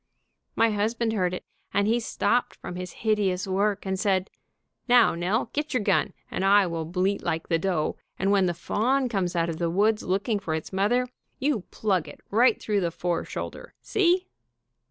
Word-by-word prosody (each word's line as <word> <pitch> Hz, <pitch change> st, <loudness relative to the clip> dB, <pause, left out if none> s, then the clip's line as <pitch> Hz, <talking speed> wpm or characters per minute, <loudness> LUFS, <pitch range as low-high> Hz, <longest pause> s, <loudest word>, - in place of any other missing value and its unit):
My 230 Hz, 0 st, +3 dB
husband 225 Hz, +2 st, 0 dB
heard 180 Hz, -4 st, +1 dB
it, 180 Hz, -, -6 dB, 0.3 s
and 200 Hz, 0 st, +3 dB
he 230 Hz, +2 st, +3 dB
stopped 240 Hz, +1 st, 0 dB
from 180 Hz, -, -8 dB
his 180 Hz, 0 st, -5 dB
hideous 200 Hz, -4 st, +1 dB
work, 200 Hz, +1 st, 0 dB
and 190 Hz, 0 st, -2 dB
said, 190 Hz, -1 st, +1 dB, 0.6 s
'Now, 245 Hz, -1 st, +6 dB
Nell, 190 Hz, +7 st, -1 dB
get 295 Hz, -1 st, -2 dB
your 240 Hz, -, +1 dB
gun, 200 Hz, -1 st, +2 dB, 0.2 s
and -, -, -2 dB
I 200 Hz, +1 st, +5 dB
will 165 Hz, -2 st, -3 dB
bleat 185 Hz, +4 st, 0 dB
like 160 Hz, 0 st, -2 dB
the 165 Hz, -2 st, +2 dB
doe, 170 Hz, -4 st, -1 dB, 0.2 s
and 195 Hz, +2 st, +1 dB
when 195 Hz, -2 st, +4 dB
the 175 Hz, -, -1 dB
fawn 255 Hz, +9 st, 0 dB
comes 185 Hz, -5 st, -1 dB
out 165 Hz, -1 st, +1 dB
of 165 Hz, -2 st, -3 dB
the 170 Hz, -1 st, 0 dB
woods 210 Hz, +5 st, +2 dB
looking 200 Hz, +4 st, 0 dB
for 165 Hz, -5 st, -2 dB
its 160 Hz, +4 st, -6 dB
mother, 230 Hz, +6 st, +2 dB, 0.3 s
you 265 Hz, -8 st, 0 dB
plug 190 Hz, -7 st, 0 dB
it -, -, -11 dB
right 235 Hz, +5 st, +4 dB
through 205 Hz, -2 st, 0 dB
the 170 Hz, -, +1 dB
fore 170 Hz, 0 st, -2 dB
shoulder, -, -, -7 dB
see?' 365 Hz, -1 st, +2 dB
200 Hz, 190 wpm, -26 LUFS, 180-225 Hz, 0.6 s, Now